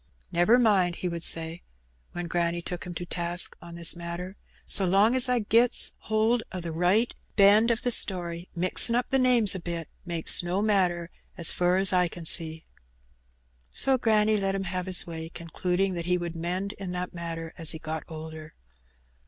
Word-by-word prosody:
"Never 175 Hz, +8 st, +3 dB
mind," 195 Hz, -7 st, +2 dB
he 180 Hz, -, -4 dB
would 170 Hz, -1 st, -5 dB
say, 165 Hz, 0 st, +3 dB, 0.5 s
when 175 Hz, 0 st, -5 dB
granny 170 Hz, 0 st, -1 dB
took 175 Hz, +1 st, -6 dB
him 175 Hz, -1 st, -8 dB
to 175 Hz, -, -5 dB
task 175 Hz, 0 st, 0 dB
on 170 Hz, 0 st, -11 dB
this 170 Hz, 0 st, +1 dB
matter, 170 Hz, +2 st, -7 dB, 0.3 s
"so 195 Hz, -, +2 dB
long's 220 Hz, +8 st, +4 dB
I 250 Hz, -, +2 dB
gets 230 Hz, +3 st, +3 dB
hold 220 Hz, +2 st, 0 dB
o' 185 Hz, -, -5 dB
the 170 Hz, -1 st, -6 dB
right 180 Hz, +8 st, +1 dB, 0.2 s
hend 210 Hz, +3 st, +5 dB
o' -, -, +2 dB
the 245 Hz, +2 st, -3 dB
story, 175 Hz, -5 st, 0 dB
mixin' 185 Hz, +6 st, +1 dB
up 245 Hz, 0 st, -2 dB
the 270 Hz, -, +2 dB
names 245 Hz, -5 st, +4 dB
a 190 Hz, -, -5 dB
bit 170 Hz, -2 st, -6 dB
makes 170 Hz, -3 st, +2 dB
no 175 Hz, +2 st, -2 dB
matter, 180 Hz, -5 st, 0 dB, 0.3 s
as 170 Hz, -3 st, +3 dB
fur 180 Hz, +1 st, +1 dB
as 190 Hz, 0 st, +4 dB
I 180 Hz, -1 st, +2 dB
can 170 Hz, -1 st, -10 dB
see." 160 Hz, -1 st, 0 dB, 1.0 s
So 265 Hz, -, +2 dB
granny 215 Hz, -2 st, +2 dB
let 195 Hz, -1 st, -1 dB
him 195 Hz, -, -3 dB
have 185 Hz, 0 st, -4 dB
his 185 Hz, -2 st, +3 dB
way, 160 Hz, -1 st, -7 dB
concluding 180 Hz, +3 st, -3 dB
that 170 Hz, -1 st, -5 dB
he 180 Hz, 0 st, +1 dB
would 170 Hz, -1 st, -6 dB
mend 180 Hz, +4 st, -3 dB
in 185 Hz, -2 st, -6 dB
that 180 Hz, 0 st, -5 dB
matter 165 Hz, -1 st, -7 dB
as 165 Hz, -3 st, -6 dB
he 160 Hz, -, -1 dB
got 160 Hz, 0 st, -6 dB
older. 160 Hz, -1 st, -10 dB
180 Hz, 185 wpm, -26 LUFS, 170-200 Hz, 1.0 s, hend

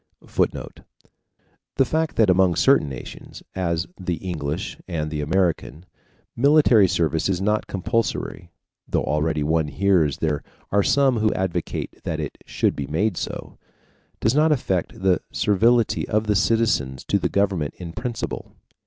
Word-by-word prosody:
[Footnote: -, -, -2 dB, 1.0 s
The 135 Hz, -, +3 dB
fact 160 Hz, +4 st, -1 dB
that 110 Hz, -, +4 dB
among 90 Hz, -1 st, +3 dB
certain 135 Hz, -, +4 dB
nations, 65 Hz, -2 st, -9 dB
as 85 Hz, -3 st, -1 dB
the 90 Hz, -2 st, -2 dB
English 80 Hz, 0 st, -4 dB
and 80 Hz, -4 st, -3 dB
the 75 Hz, -1 st, -2 dB
American, 85 Hz, -1 st, -1 dB, 0.5 s
military 135 Hz, -6 st, +5 dB
service 80 Hz, 0 st, 0 dB
is 90 Hz, -2 st, 0 dB
not 105 Hz, +2 st, 0 dB
compulsory 110 Hz, -3 st, -2 dB, 0.4 s
(though -, -, 0 dB
already 75 Hz, +1 st, 0 dB
one 80 Hz, +1 st, +1 dB
hears 75 Hz, 0 st, +2 dB
there 75 Hz, -2 st, -1 dB, 0.3 s
are 100 Hz, -, +4 dB
some 135 Hz, +3 st, +3 dB
who 110 Hz, 0 st, +2 dB
advocate 90 Hz, -3 st, -3 dB
that 80 Hz, -, -3 dB
it 75 Hz, -3 st, -5 dB
should -, -, 0 dB
be 70 Hz, -1 st, -4 dB
made 90 Hz, +7 st, 0 dB
so) -, -, -6 dB, 0.6 s
does 110 Hz, -, +2 dB
not 155 Hz, +2 st, +4 dB
affect 95 Hz, -, -1 dB
the 95 Hz, -3 st, +3 dB
servility 115 Hz, +3 st, +2 dB
of 110 Hz, +1 st, +1 dB
the 105 Hz, -1 st, +1 dB
citizens 95 Hz, -, +1 dB
to -, -, +1 dB
the -, -, 0 dB
government 95 Hz, -7 st, 0 dB
in 85 Hz, -2 st, -7 dB
principle. 120 Hz, +1 st, -5 dB
95 Hz, 145 wpm, -23 LUFS, 80-110 Hz, 1.0 s, military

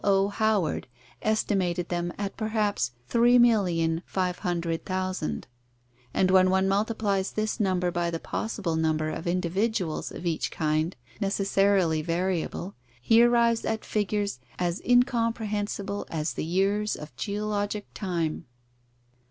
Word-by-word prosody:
O. 195 Hz, 0 st, +3 dB
Howard 205 Hz, -9 st, 0 dB, 0.3 s
estimated 190 Hz, -5 st, 0 dB
them 175 Hz, 0 st, -1 dB
at 200 Hz, -1 st, -3 dB
perhaps 215 Hz, -, 0 dB, 0.2 s
3,500,000, 180 Hz, -, +1 dB, 0.7 s
and 185 Hz, +7 st, +2 dB
when 185 Hz, 0 st, +6 dB
one 190 Hz, +1 st, +3 dB
multiplies 200 Hz, -1 st, 0 dB
this 215 Hz, 0 st, -1 dB
number 185 Hz, -3 st, +1 dB
by 175 Hz, 0 st, 0 dB
the 165 Hz, -, -2 dB
possible 190 Hz, -6 st, -3 dB
number 155 Hz, -1 st, +1 dB
of 160 Hz, -, -5 dB
individuals 180 Hz, +1 st, -1 dB
of -, -, -8 dB
each 165 Hz, -2 st, 0 dB
kind, 155 Hz, +2 st, 0 dB, 0.2 s
necessarily 195 Hz, -4 st, +2 dB
variable, 175 Hz, +2 st, -2 dB, 0.3 s
he 225 Hz, -, +5 dB
arrives 235 Hz, -1 st, +4 dB
at 220 Hz, 0 st, -2 dB
figures 205 Hz, -, -1 dB, 0.2 s
as 175 Hz, 0 st, -1 dB
incomprehensible 220 Hz, -5 st, 0 dB
as 155 Hz, 0 st, -2 dB
the -, -, -3 dB
years 195 Hz, +5 st, +1 dB
of 150 Hz, -, -10 dB
geologic 205 Hz, 0 st, -2 dB
time. 170 Hz, -6 st, -2 dB
190 Hz, 110 wpm, -27 LUFS, 170-210 Hz, 0.7 s, when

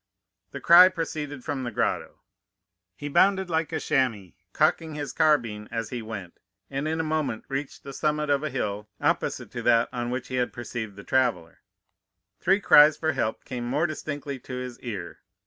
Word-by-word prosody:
"The -, -, -7 dB
cry 180 Hz, +2 st, +8 dB
proceeded 150 Hz, -6 st, -5 dB
from 135 Hz, -, -3 dB
the 125 Hz, -, -3 dB
grotto. 110 Hz, -, -2 dB, 0.7 s
He 145 Hz, -, -6 dB
bounded 190 Hz, +4 st, +3 dB
like 160 Hz, 0 st, 0 dB
a 160 Hz, -, -1 dB
chamois, 115 Hz, -, 0 dB, 0.2 s
cocking 155 Hz, +3 st, +1 dB
his 145 Hz, -1 st, -4 dB
carbine 115 Hz, -9 st, +1 dB
as 115 Hz, -1 st, -4 dB
he 125 Hz, -2 st, -3 dB
went, 100 Hz, -6 st, -8 dB, 0.3 s
and 140 Hz, +2 st, -2 dB
in 160 Hz, +1 st, -1 dB
a -, -, +1 dB
moment 155 Hz, -7 st, -2 dB
reached 135 Hz, +1 st, -4 dB
the 140 Hz, -, -8 dB
summit 150 Hz, +1 st, 0 dB
of 140 Hz, -1 st, +2 dB
a 155 Hz, -, -2 dB
hill 105 Hz, -5 st, -3 dB
opposite -, -, -1 dB
to -, -, -5 dB
that 115 Hz, -1 st, +3 dB
on 120 Hz, -1 st, -3 dB
which 125 Hz, 0 st, -4 dB
he 130 Hz, -, -3 dB
had 125 Hz, -1 st, 0 dB
perceived 120 Hz, -3 st, -6 dB
the 100 Hz, -, -10 dB
traveller. 120 Hz, -12 st, 0 dB, 0.8 s
Three 195 Hz, +3 st, +3 dB
cries 150 Hz, -5 st, +7 dB
for 160 Hz, -1 st, 0 dB
help 120 Hz, -6 st, -2 dB
came 120 Hz, -1 st, -5 dB
more 145 Hz, +7 st, +1 dB
distinctly 145 Hz, -3 st, -5 dB
to 125 Hz, +1 st, -8 dB
his 125 Hz, -1 st, -6 dB
ear. 115 Hz, -6 st, -6 dB
135 Hz, 180 wpm, -26 LUFS, 120-155 Hz, 0.8 s, cry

